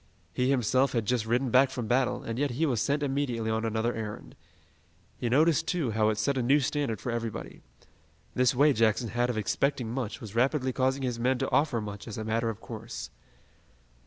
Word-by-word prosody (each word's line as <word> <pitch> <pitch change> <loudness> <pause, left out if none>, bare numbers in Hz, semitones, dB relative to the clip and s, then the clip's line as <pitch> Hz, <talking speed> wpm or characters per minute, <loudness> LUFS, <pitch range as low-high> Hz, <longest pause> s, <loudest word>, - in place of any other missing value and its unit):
He 125 +1 +1
himself 130 +1 +2
had 115 -3 0
just 115 0 0
ridden 120 +2 +1
back 130 +2 +5
from 125 -3 -4
battle, 125 +3 +1
and 115 +2 -4
yet 145 0 +1
he 135 +6 0
was 125 -8 0
sent 145 +1 0
immediately 130 -5 -1
on 110 0 -1
another 115 +1 0
errand. 105 - -6 0.8
He 120 - -1
noticed, 155 +5 +3
too, 160 -10 0
how 110 0 +2
it 110 - -1
set 130 +5 0
a - - +1
new 135 +5 +4
standard 135 -5 -1
for 125 - -3
everybody. 115 -1 -5 0.7
This 125 0 +2
way 145 +3 +5
Jackson 115 0 +2
had 120 +3 0
of 120 - -2
expecting 120 +2 0
much 120 -4 -3
was 105 -3 -9
rapidly 130 +2 +1
causing 130 +1 0
his 125 -2 -2
men 130 +2 +2
to 135 +1 -2
offer 145 -5 +2
much 105 0 -7
as 110 - -6
a 110 - -3
matter 115 +1 0
of 110 -1 -5
course. 115 -1 -7
120 Hz, 205 wpm, -28 LUFS, 110-135 Hz, 0.8 s, back